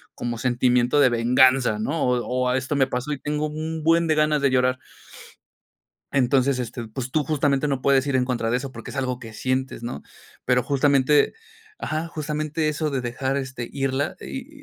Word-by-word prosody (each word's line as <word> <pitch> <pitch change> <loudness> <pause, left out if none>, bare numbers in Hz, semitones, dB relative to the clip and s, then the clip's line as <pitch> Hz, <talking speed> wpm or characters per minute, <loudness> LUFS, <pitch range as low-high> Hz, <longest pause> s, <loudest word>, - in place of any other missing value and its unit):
como 120 -1 -4
sentimiento 125 +2 +2
de 135 - +6
venganza, 125 0 +4
¿no? 145 +8 -1
O 125 -1 +1 0.2
o - - +1
esto 130 +3 -1
me 135 -1 +3
pasó 125 +3 -3
y 145 - -3
tengo 150 +1 -2
un 155 +1 -5
buen 165 +1 +3
de 155 - +2
ganas 150 -1 +2
de 140 - +3
llorar. 130 0 +2 1.3
Entonces 135 0 +2
este, 120 -1 -5
pues 125 +3 -5
tú 150 +2 +1
justamente 145 -2 +1
no 135 -2 -2
puedes 140 -1 +3
ir 140 - -1
en 125 - +2
contra 125 -3 -1
de 125 - +2
eso 135 +1 -6
porque 115 -2 -9
es - - -8
algo 130 -2 -1
que 115 -3 -10
sientes, 130 +2 -2
¿no? 115 -11 -5 0.4
Pero 125 0 +2
justamente, 140 +1 +3 0.5
ajá, 155 +2 -3
justamente 155 0 -2
eso 155 0 -1
de 135 -2 -1
dejar, 130 +2 -2
este, 130 -3 -4
irla 135 0 -1
y 280 +3 -8
135 Hz, 190 wpm, -23 LUFS, 125-150 Hz, 1.3 s, de